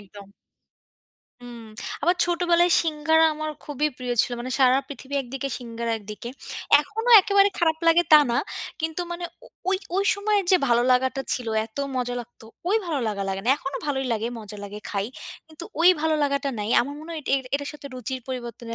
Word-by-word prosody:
একদম। 200 0 -13 1.2
হুম। 240 -1 -10 0.4
আবার 350 +4 +3
ছোটবেলায় 345 0 +2
সিঙ্গাড়া 320 0 +2
আমার 310 0 -4
খুবই 295 +1 -1
প্রিয় 250 -1 -3
ছিল। 250 - -4
মানে 250 +2 -5
সারা 260 +1 +5
পৃথিবী 280 0 -8
একদিকে 270 +2 -5
সিঙ্গাড়া 235 -1 -4
একদিকে। 210 +2 -8 0.5
এখনো 450 +10 -3
একেবারে 400 +1 +4
খারাপ 320 -2 +2
লাগে 330 +1 +6
তা 305 - +10
না। 235 - +1 0.4
কিন্তু 320 +2 -2
মানে 345 0 -5 0.2
ও - - -14 0.2
ওই, 385 - +3 0.2
ওই 395 - +2
সময়ের 405 0 +1
যে 375 - +7
ভালো 240 0 +4
লাগাটা 260 +2 +1
ছিল, 245 - -2 0.2
এত 220 - -34 0.2
মজা 245 -1 -1
লাগত, 240 0 -14 0.3
ওই 415 - +3
ভালো 310 -5 -1
লাগা 200 -2 -3
লাগে 195 0 -2
না। - - -1
এখনো 275 -1 -5
ভালোই 270 -2 -1
লাগে, 225 0 -1
মজা 210 -1 -9
লাগে 205 +1 -8
খাই। 200 -1 -1 0.4
কিন্তু 315 +1 -11 0.2
ওই 340 - +7
ভালো 320 0 +1
লাগাটা 280 0 0
নাই। 210 0 -3
আমার 280 +4 -4
মনে 315 +2 -10
হয় 320 - -5
এট - - -33 0.3
এটার 285 0 -2
সাথে 295 -1 -10
রুচির 255 +1 -4
পরিবর্তনের 240 -2 -6
275 Hz, 185 wpm, -24 LUFS, 240-320 Hz, 1.2 s, তা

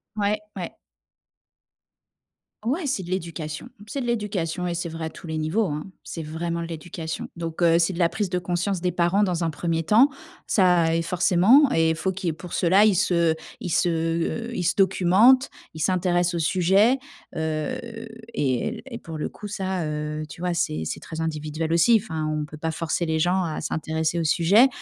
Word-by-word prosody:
Ouais, 210 0 0
ouais. 180 -3 -5 1.9
Ouais, 290 +9 -1
c'est 255 -8 0
de 175 - -9
l'éducation, 165 -4 -4 0.2
c'est 275 - -3
de - - -3
l'éducation 195 -7 -2
et 175 - -2
c'est 170 0 -2
vrai 165 0 -5
à 160 - -3
tous - - -13
les 160 -1 -3
niveaux 165 +9 +1
hein, 150 -3 -3 0.2
c'est 165 - -6
vraiment 170 +2 -3
de 165 - -4
l'éducation. 165 -1 -6
Donc 165 0 -4
heu 165 0 +5
c'est 170 +2 +2
de 175 - -7
la 170 - +4
prise 185 +3 -2
de 180 - -1
conscience 180 +1 -1
des 180 0 0
parents 175 +4 +2
dans 180 -3 0
un 165 - +1
premier 165 +2 -1
temps, 220 - +5 0.4
ça 180 -4 +3
et 165 - +1
forcément 185 - +4
et 160 0 +3
faut 190 +4 -1
qu'il 185 -1 -5
y - - +3
ait - - -1
pour 175 +2 -10
cela 190 +4 +4
ils 215 - +5
se 170 -3 +2 0.3
ils 180 - -4
se 175 - +3
heu 165 +8 -1
ils - - -1
se 175 +1 +1
documentent, 195 +7 +5 0.2
ils 160 - -9
s'intéressent 180 0 +1
au - - -1
sujet 195 +9 +3 0.4
heu 155 -1 -2 0.6
et 140 - -1
et 230 - -5
pour 160 -1 -8
le 150 - -2
coup 210 - -9
ça 190 -3 -2
heu 150 0 -3
tu 140 - -10
vois, 180 -1 0
c'est 170 - -1
c'est - - -4
très 160 - -8
individuel 160 0 -2
aussi. 220 +7 +5
Enfin 160 -7 -4
on 155 -1 -2
peut 155 0 -11
pas 160 +2 -2
forcer 165 +1 -2
les 160 0 0
gens 180 +4 +2
à 160 -3 -3
s'intéresser 160 +1 -1
au 165 - 0
sujet. 185 - +5
170 Hz, 200 wpm, -24 LUFS, 160-190 Hz, 1.9 s, heu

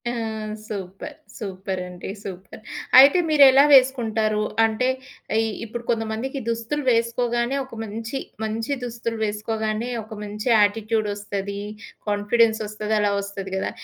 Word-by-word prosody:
ఆ! - - -1 0.6
Super! 200 +8 -7 0.2
Super 190 -3 -4
అండి. 180 0 -8
Super. 190 +1 -9 0.4
అయితే 280 +7 +8
మీరెలా 280 -3 +7
వేసుకుంటారు? 225 -5 +4 0.2
అంటే 225 +3 +1 0.5
ఇ - - +1 0.2
ఇప్పుడు 235 +2 -6
కొంతమందికి 225 +4 -2
దుస్తులు 230 +6 -2
వేసుకోగానే 235 +2 +1
ఒక 260 - -12
మంచి, 225 +4 -5 0.3
మంచి 225 +5 -2
దుస్తులు 230 -1 -4
వేసుకోగానే 215 +2 -2
ఒక 220 +1 -10
మంచి 210 +2 -6
యాటిట్యూడ్ 215 +1 +1
ఒస్తది. 200 -1 -4 0.5
కాన్ఫిడెన్స్ 220 +2 +2
ఒస్తది. 215 +1 -3
అలా 205 -1 +2
ఒస్తది 200 -1 -6
గదా! 190 - -1
220 Hz, 120 wpm, -23 LUFS, 205-235 Hz, 0.6 s, అయితే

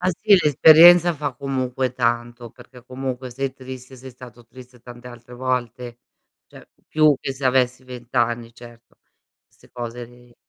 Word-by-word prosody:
Ah, 180 - -1
sì 205 +3 +3
l'esperienza 170 +4 +6
fa 145 -2 -4
comunque 130 -1 -3
tanto, 120 -1 -3
perché 125 +1 -17
comunque 130 0 -6
sei 135 +2 -4
triste, 130 0 -12
sei 130 +1 -12
stato 120 -1 -15
triste 125 0 -16
tante 120 +1 -14
altre 120 0 -14
volte. 125 -1 -4 0.5
Cioè - - -17 0.2
più 155 -2 +3
che 135 - -5
se 135 +1 -10
avessi 130 0 0
20 125 -1 -12
anni 120 -1 -1
certo. 120 -1 -17 0.5
'Ste - - -25
cose 120 0 -7
lì 120 0 -20
125 Hz, 155 wpm, -21 LUFS, 120-130 Hz, 0.5 s, l'esperienza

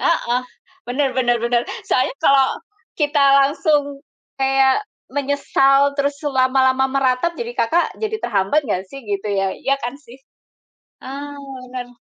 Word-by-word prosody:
Heeh. 250 -7 +1 0.5
Bener 270 +3 +1
bener 240 -2 +2
bener. 240 0 +2 0.2
Soalnya 255 - +1
kalau 270 -1 +5 0.5
kita 295 -1 +1 0.2
langsung 285 -1 0 0.4
kayak 270 +3 +3 0.3
menyesal, 280 0 +2
terus 280 0 -1
lama-lama 260 -1 +2
meratap, 270 +5 0
jadi 475 0 -5
Kakak 340 - 0
jadi 440 0 -2
terhambat 210 - 0
nggak 190 -6 -2
sih 275 +2 -10
gitu 205 0 -3
ya, 195 -1 0
iya 275 0 -1
kan 245 -3 -5
sih? 250 -3 -15 0.8
Eee, 285 +2 -8 0.3
bener. 245 -1 -7
270 Hz, 130 wpm, -20 LUFS, 250-285 Hz, 0.8 s, kalau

